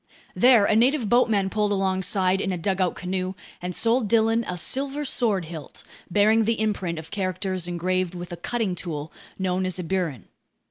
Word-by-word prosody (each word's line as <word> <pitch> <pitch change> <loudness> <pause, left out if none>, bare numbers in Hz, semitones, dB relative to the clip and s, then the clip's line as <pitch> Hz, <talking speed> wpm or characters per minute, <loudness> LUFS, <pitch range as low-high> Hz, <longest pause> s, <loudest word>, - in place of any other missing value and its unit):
There 245 -4 +6
a 215 - +2
native 245 0 +3
boatman 215 -5 +3
pulled 210 -1 +1
alongside 190 -1 +1
in 195 - -1
a 180 - -2
dugout 185 +1 0
canoe 185 +1 -3 0.3
and 180 0 -4
sold 230 0 +2
Dillon 225 +1 +3
a 180 - -3
silver 275 - -1
sword 215 -9 +1
hilt 160 -3 -9 0.3
bearing 215 +4 +4
the 225 0 0
imprint 195 -6 -1
of 160 0 -9
characters 185 -2 -2
engraved 180 +1 -1
with 175 0 -7
a 175 - -5
cutting 220 +1 -2
tool 160 -4 -5 0.2
known 185 -1 -1
as 185 0 -1
a 180 - -4
burin. 165 - -2
190 Hz, 175 wpm, -24 LUFS, 180-220 Hz, 0.3 s, There